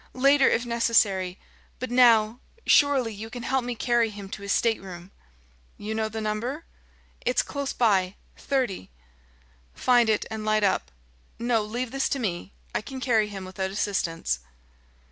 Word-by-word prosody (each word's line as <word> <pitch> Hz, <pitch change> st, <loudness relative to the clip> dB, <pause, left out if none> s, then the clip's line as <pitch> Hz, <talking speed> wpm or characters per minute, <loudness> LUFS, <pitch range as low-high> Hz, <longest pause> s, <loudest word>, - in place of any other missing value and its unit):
Later, 275 Hz, +1 st, +5 dB
if 240 Hz, -, +1 dB
necessary; 210 Hz, -6 st, +2 dB, 0.4 s
but 255 Hz, 0 st, -5 dB
now 235 Hz, -2 st, +5 dB, 0.3 s
surely, 270 Hz, -6 st, +4 dB
you 215 Hz, +2 st, -8 dB
can 240 Hz, +1 st, -7 dB
help 265 Hz, 0 st, 0 dB
me 245 Hz, 0 st, -3 dB
carry 235 Hz, -1 st, +2 dB
him 200 Hz, -2 st, -9 dB
to 195 Hz, -, -7 dB
his 200 Hz, 0 st, -3 dB
stateroom." 190 Hz, -6 st, -1 dB, 0.7 s
"You 215 Hz, +1 st, -5 dB
know 220 Hz, 0 st, -1 dB
the 220 Hz, +1 st, -5 dB
number?" 230 Hz, +9 st, -3 dB, 0.6 s
"It's 250 Hz, -, +2 dB
close 280 Hz, -1 st, -4 dB
by 195 Hz, -5 st, +2 dB, 0.2 s
30." 255 Hz, -, -2 dB, 0.9 s
"Find 240 Hz, -2 st, +3 dB
it, 215 Hz, -, +1 dB
and 220 Hz, -1 st, -4 dB
light 215 Hz, 0 st, +1 dB
up. 195 Hz, -2 st, +1 dB, 0.5 s
No 235 Hz, -1 st, +1 dB
leave 235 Hz, +3 st, -4 dB
this 270 Hz, 0 st, 0 dB
to 275 Hz, -, -1 dB
me; 190 Hz, -4 st, -3 dB, 0.2 s
I -, -, 0 dB
can 265 Hz, +4 st, -8 dB
carry 225 Hz, -5 st, +2 dB
him 195 Hz, -2 st, -7 dB
without 190 Hz, +1 st, -3 dB
assistance." 170 Hz, -, -1 dB
220 Hz, 155 wpm, -26 LUFS, 200-245 Hz, 0.9 s, Later